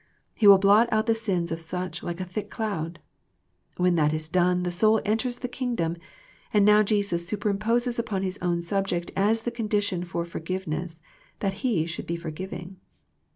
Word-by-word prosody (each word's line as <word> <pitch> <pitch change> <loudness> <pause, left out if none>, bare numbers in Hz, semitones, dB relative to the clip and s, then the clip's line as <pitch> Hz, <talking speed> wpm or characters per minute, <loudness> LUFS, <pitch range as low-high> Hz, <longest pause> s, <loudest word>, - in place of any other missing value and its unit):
He 210 - +3
will 200 -1 +10
blot 205 +4 +5
out 220 0 +2
the 225 - +3
sins 195 -7 -1
of 165 0 -3
such 180 +2 -4
like 175 0 -5
a 185 - -3
thick 205 +3 -5
cloud. 170 -7 -3 0.8
When 180 0 +3
that 150 -1 +3
is 155 0 -3
done 180 +1 +2
the 175 - -1
soul 215 +5 +4
enters 225 +4 0
the 250 - -4
Kingdom, 240 -10 -2 0.6
and 205 -1 +4
now 210 0 +7
Jesus 200 -5 0
superimposes 220 +4 0
upon 210 -5 -2
His 190 +1 -3
own 175 -1 0
subject 180 -1 -1
as 220 +3 +2
the 240 - -2
condition 210 -5 -1
for 170 -1 -3
forgiveness 170 -1 -4 0.3
that 195 -2 -1
he 210 -11 +1
should 165 0 -5
be 170 - -1
forgiving. 175 +2 -7
190 Hz, 175 wpm, -26 LUFS, 170-215 Hz, 0.8 s, will